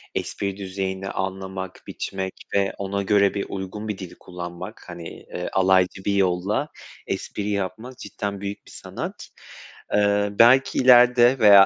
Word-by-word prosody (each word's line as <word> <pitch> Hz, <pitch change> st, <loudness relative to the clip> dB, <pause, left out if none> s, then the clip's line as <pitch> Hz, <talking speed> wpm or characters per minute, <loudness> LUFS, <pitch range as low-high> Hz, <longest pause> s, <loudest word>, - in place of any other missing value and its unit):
espri 100 Hz, -1 st, -3 dB
düzeyini 95 Hz, 0 st, -4 dB
anlamak, 95 Hz, -1 st, -4 dB
biçmek 95 Hz, -1 st, -4 dB, 0.2 s
ve 100 Hz, -1 st, +2 dB
ona 100 Hz, 0 st, -2 dB
göre 100 Hz, 0 st, +3 dB
bir 100 Hz, -, -2 dB
uygun 100 Hz, +3 st, -5 dB
bir 105 Hz, -, -3 dB
dil 95 Hz, -2 st, -8 dB
kullanmak, 90 Hz, +3 st, -8 dB
hani, 85 Hz, -1 st, -7 dB
eee, 90 Hz, -, -7 dB
alaycı 95 Hz, 0 st, +3 dB
bir 100 Hz, -, +2 dB
yolla 95 Hz, +7 st, +1 dB, 0.4 s
espri 105 Hz, 0 st, -3 dB
yapmak 105 Hz, +6 st, -3 dB
cidden 100 Hz, -2 st, -5 dB
büyük 100 Hz, +1 st, -5 dB
bir -, -, -15 dB
sanat. -, -, -7 dB, 0.7 s
Eee, 105 Hz, 0 st, +3 dB
belki 120 Hz, +5 st, +5 dB
ileride 125 Hz, 0 st, +6 dB
veya, 100 Hz, -3 st, +9 dB
100 Hz, 140 wpm, -24 LUFS, 95-105 Hz, 0.7 s, veya